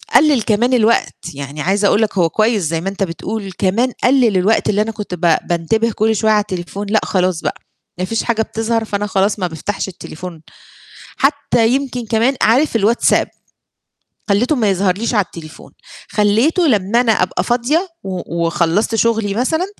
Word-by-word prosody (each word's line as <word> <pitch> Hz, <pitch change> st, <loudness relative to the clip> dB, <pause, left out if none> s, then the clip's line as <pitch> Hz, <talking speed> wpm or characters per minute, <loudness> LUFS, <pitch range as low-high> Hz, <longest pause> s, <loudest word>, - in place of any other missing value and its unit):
قلَّل 295 Hz, -6 st, +5 dB
كمان 235 Hz, +5 st, +1 dB
الوقت، 230 Hz, -1 st, +2 dB, 0.2 s
يعني 140 Hz, +1 st, -7 dB
عايزة 200 Hz, +4 st, +1 dB
أقول 210 Hz, -, +2 dB
لك، 215 Hz, -2 st, -1 dB
هو 170 Hz, -2 st, +3 dB
كويس 215 Hz, +2 st, +1 dB
زي 165 Hz, +1 st, -1 dB
ما 195 Hz, -, -2 dB
أنت 195 Hz, 0 st, -3 dB
بتقول، 195 Hz, +3 st, -5 dB
كمان 200 Hz, +7 st, 0 dB
قلَّل 245 Hz, -6 st, +3 dB
الوقت 205 Hz, +5 st, +2 dB
اللي 210 Hz, 0 st, +2 dB
أنا 225 Hz, +1 st, -1 dB
كنت 210 Hz, -4 st, -7 dB
ب 170 Hz, -2 st, +2 dB
بانتبه 220 Hz, +7 st, 0 dB
كل 220 Hz, +1 st, +1 dB
شوية 220 Hz, +1 st, +2 dB
على 210 Hz, -1 st, +4 dB
التليفون، 195 Hz, +1 st, -5 dB
لأ 215 Hz, 0 st, +3 dB
خلاص 185 Hz, -3 st, 0 dB
بقى، -, -, -4 dB, 0.4 s
ما 185 Hz, -, 0 dB
فيش 225 Hz, +3 st, -2 dB
حاجة 225 Hz, -2 st, 0 dB
بتظهر، 225 Hz, 0 st, -2 dB
فأنا 205 Hz, 0 st, -2 dB
خلاص 200 Hz, +1 st, 0 dB
ما 180 Hz, -, 0 dB
بافتحش 175 Hz, +5 st, -4 dB
التليفون 175 Hz, -2 st, -9 dB, 0.8 s
حتى. 275 Hz, -5 st, +1 dB
يمكن 250 Hz, -2 st, -2 dB
كمان، 235 Hz, +5 st, +1 dB
عارف 245 Hz, +4 st, +3 dB
الواتساب؟ 225 Hz, +2 st, +2 dB, 1.0 s
خليته 240 Hz, +9 st, +2 dB
ما 220 Hz, -5 st, +1 dB
يظهرليش 195 Hz, +4 st, 0 dB
على 205 Hz, -3 st, +2 dB
التليفون، 160 Hz, -3 st, -12 dB, 0.4 s
خليته 225 Hz, -, +2 dB
لما 215 Hz, -1 st, +2 dB
أنا 235 Hz, -2 st, +2 dB
أبقى -, -, -1 dB
فاضية، 285 Hz, +10 st, 0 dB
و 175 Hz, -3 st, -3 dB
وخلصت 170 Hz, +7 st, 0 dB
شغلي 225 Hz, -2 st, +1 dB
مثلًا، 315 Hz, -, 0 dB
210 Hz, 170 wpm, -17 LUFS, 185-230 Hz, 1.0 s, قلَّل